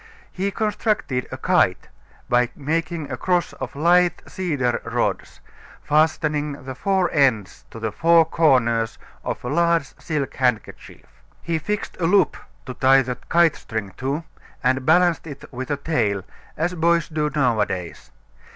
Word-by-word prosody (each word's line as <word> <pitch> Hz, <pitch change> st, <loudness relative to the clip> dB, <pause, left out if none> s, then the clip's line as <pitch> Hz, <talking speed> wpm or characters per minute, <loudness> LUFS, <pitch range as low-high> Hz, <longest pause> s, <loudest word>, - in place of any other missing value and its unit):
He 195 Hz, +2 st, -2 dB
constructed 210 Hz, -, -1 dB
a -, -, -5 dB
kite -, -, +2 dB, 0.4 s
by 120 Hz, 0 st, +2 dB
making 160 Hz, 0 st, -3 dB
a 130 Hz, -, -3 dB
cross 180 Hz, +5 st, 0 dB
of 130 Hz, 0 st, -7 dB
light 175 Hz, +3 st, +3 dB
cedar 145 Hz, -10 st, -1 dB
rods, -, -, -2 dB, 0.4 s
fastening 150 Hz, -1 st, +1 dB
the 130 Hz, -, -5 dB
four 190 Hz, +5 st, 0 dB
ends 125 Hz, -9 st, +1 dB
to -, -, -11 dB
the 110 Hz, -1 st, -2 dB
four 165 Hz, +7 st, +4 dB
corners 120 Hz, -8 st, +2 dB, 0.3 s
of -, -, -4 dB
a -, -, -2 dB
large 170 Hz, -1 st, +1 dB
silk 150 Hz, -4 st, -3 dB
handkerchief. 125 Hz, -5 st, -2 dB, 0.4 s
He 165 Hz, -1 st, -1 dB
fixed 210 Hz, +6 st, -4 dB
a 165 Hz, -, +2 dB
loop 190 Hz, -2 st, +3 dB, 0.3 s
to 130 Hz, -, -6 dB
tie 135 Hz, +1 st, +4 dB
the 125 Hz, -1 st, -4 dB
kite 170 Hz, -2 st, +4 dB
string 110 Hz, -4 st, -5 dB
to 140 Hz, +5 st, -2 dB, 0.4 s
and 130 Hz, 0 st, +1 dB
balanced 175 Hz, 0 st, +3 dB
it 145 Hz, -2 st, -9 dB
with 130 Hz, +1 st, -5 dB
a 145 Hz, -, 0 dB
tail, 115 Hz, -, -1 dB, 0.3 s
as 175 Hz, +3 st, 0 dB
boys 170 Hz, -1 st, +2 dB
do 155 Hz, -1 st, -1 dB
nowadays. 105 Hz, -, -1 dB
150 Hz, 145 wpm, -22 LUFS, 125-170 Hz, 0.4 s, four